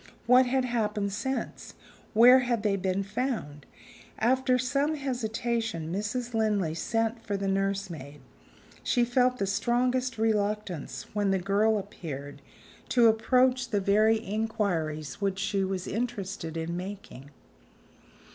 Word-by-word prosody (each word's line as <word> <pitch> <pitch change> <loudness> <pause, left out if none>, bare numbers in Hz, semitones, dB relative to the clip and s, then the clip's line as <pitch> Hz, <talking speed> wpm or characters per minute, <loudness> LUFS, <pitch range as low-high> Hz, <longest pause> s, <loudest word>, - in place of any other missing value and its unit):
What 250 +2 +6
had 260 0 +1
happened 210 -4 -1
since? 265 +6 -4 0.4
Where 245 +4 +8
had 240 -4 -1
they 205 -2 +2
been 190 0 -1
found? 200 - -4 0.5
After 255 +2 +2
some 275 +5 0
hesitation, 230 - -2
Mrs. 235 +5 -3
Linley 210 -7 +1
sent 225 +6 -1
for 200 -1 -2
the 195 0 -2
nursemaid. 195 -7 -2 0.6
She 245 -2 +2
felt 250 +1 +2
the 200 - 0
strongest 250 +5 0
reluctance, 210 -6 -1
when 205 -1 +1
the 195 - +2
girl 200 +4 +2
appeared, 145 -8 -7 0.5
to 235 -2 +5
approach 250 +3 +2
the 210 -4 +1
very 215 +3 +3
inquiries 200 - -2
which 195 -1 0
she 195 0 0
was 190 -1 -2
interested 200 -8 -4
in 165 +1 -3
making. 180 -7 -8
210 Hz, 125 wpm, -28 LUFS, 195-240 Hz, 0.6 s, Where